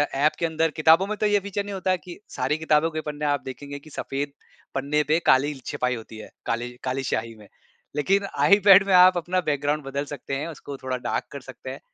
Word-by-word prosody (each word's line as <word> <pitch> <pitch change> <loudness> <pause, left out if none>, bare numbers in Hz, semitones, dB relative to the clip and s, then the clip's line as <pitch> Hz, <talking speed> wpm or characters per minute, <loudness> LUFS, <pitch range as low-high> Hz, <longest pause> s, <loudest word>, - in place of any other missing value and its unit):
App 150 +3 +2
के 170 - +1
अंदर 160 0 0
किताबों 160 +5 +4
में 215 - -2
तो - - 0
ये 205 -1 +3
फीचर 200 +1 -3
नहीं 205 0 -7
होता 190 -1 -1
है 185 - +2
कि 175 -1 -10 0.2
सारी 130 +4 0
किताबों 160 0 +2
के 155 0 -3
पन्ने 150 0 -5
आप 145 -2 +1
देखेंगे 140 +2 -7
कि 155 - -16
सफेद 140 0 -4 0.4
पन्ने 145 +3 +1
पे 155 +2 +3
काली 145 +3 +4
ल 135 - -12
छपाई 125 0 -1
होती 110 -1 -10
है, 110 - -10 0.2
काली 120 +1 -2
काली 130 +1 -2
स्याही 115 -1 -2
में। 105 -1 -16 0.5
लेकिन 195 +7 +2 0.2
आईपैड 200 -1 +7
में 195 - +2
आप 180 0 +7
अपना 180 +2 0
बैकग्राउंड 145 +1 0
बदल 140 +1 -3
सकते 140 -1 -5
हैं, 145 +4 -3
उसको 145 -3 -8
थोड़ा 130 -1 -3
डार्क 125 - -2
कर - - -7
सकते - - -10
हैं। - - -7
150 Hz, 230 wpm, -24 LUFS, 135-175 Hz, 0.5 s, आईपैड